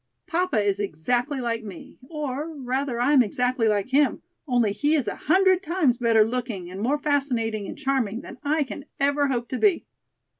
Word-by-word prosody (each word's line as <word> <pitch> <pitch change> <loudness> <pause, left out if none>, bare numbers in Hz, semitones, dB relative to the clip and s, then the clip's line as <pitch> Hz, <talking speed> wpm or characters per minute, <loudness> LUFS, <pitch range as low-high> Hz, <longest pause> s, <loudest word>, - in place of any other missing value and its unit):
Papa 345 -8 0
is 205 -1 0
exactly 240 - -1
like 230 -2 -2
me, 200 -5 -11
or, 300 +1 -4
rather, 260 -1 -2
I 255 +5 +3
am 270 - +7
exactly 245 +1 0
like 210 +2 0
him, 280 +2 +2 0.2
only 240 -5 +2
he 290 +9 +1
is 280 -6 0
a - - -2
hundred 375 +3 +3
times 325 -10 +1
better 225 -3 +4
looking 225 -7 -4
and 190 +2 -6
more 265 +7 +1
fascinating 245 -8 -1
and - - -7
charming 250 -5 -1
than - - -11
I 300 +1 +1
can 275 +1 -8
ever 285 +1 +2
hope 240 -3 -2
to 255 - -3
be." 400 -5 +3
255 Hz, 185 wpm, -25 LUFS, 225-290 Hz, 0.2 s, am